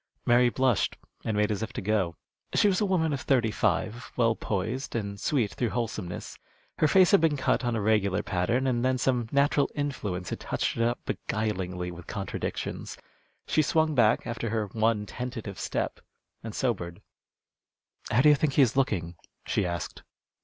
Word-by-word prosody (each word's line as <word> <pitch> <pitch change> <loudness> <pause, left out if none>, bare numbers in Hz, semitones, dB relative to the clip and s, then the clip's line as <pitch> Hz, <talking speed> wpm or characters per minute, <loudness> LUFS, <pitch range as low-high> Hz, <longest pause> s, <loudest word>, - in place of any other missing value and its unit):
Mary 120 +1 +5
blushed, 125 -6 +1 0.3
and 110 -2 -1
made 105 +1 +2
as 105 - -2
if 110 +1 -3
to - - -5
go. 95 -4 0 0.4
She - - +5
was 190 -1 +2
a 205 - +2
woman 160 -5 +1
of 140 - -2
thirty 120 -5 +2
five, 110 +3 -1
well 115 -2 +3
poised, 110 +9 -3
and 100 -3 -3
sweet 120 -6 +1
through 120 - -1
wholesomeness. 110 -7 -4 0.4
Her 155 - +5
face 185 +3 +5
had 200 - +6
been 160 -3 +3
cut 130 - +1
on 120 -1 0
a 110 - -1
regular 105 -2 +2
pattern, 115 +9 0
and 120 -2 +1
then 130 0 +2
some 125 -3 0
natural 140 0 +3
influence 105 - -3
had - - -3
touched - - -2
it - - -1
up 120 +1 0
beguilingly 95 -5 -2
with 85 -1 -11
contradictions. 100 -2 -4 0.5
She 155 - +2
swung 155 +1 +2
back, 120 -6 +3
after 115 -1 -3
her 110 -1 0
one 110 0 +1
tentative 120 -5 -6
step, - - -2 0.4
and 110 -1 -6
sobered. 100 -7 -2 1.1
"How 120 - +4
do 150 - +7
you - - +8
think 145 -1 0
he 140 - +6
is 125 -1 +1
looking?" 90 -11 0 0.3
she 95 - 0
asked. 85 -2 -4
115 Hz, 180 wpm, -28 LUFS, 105-130 Hz, 1.1 s, you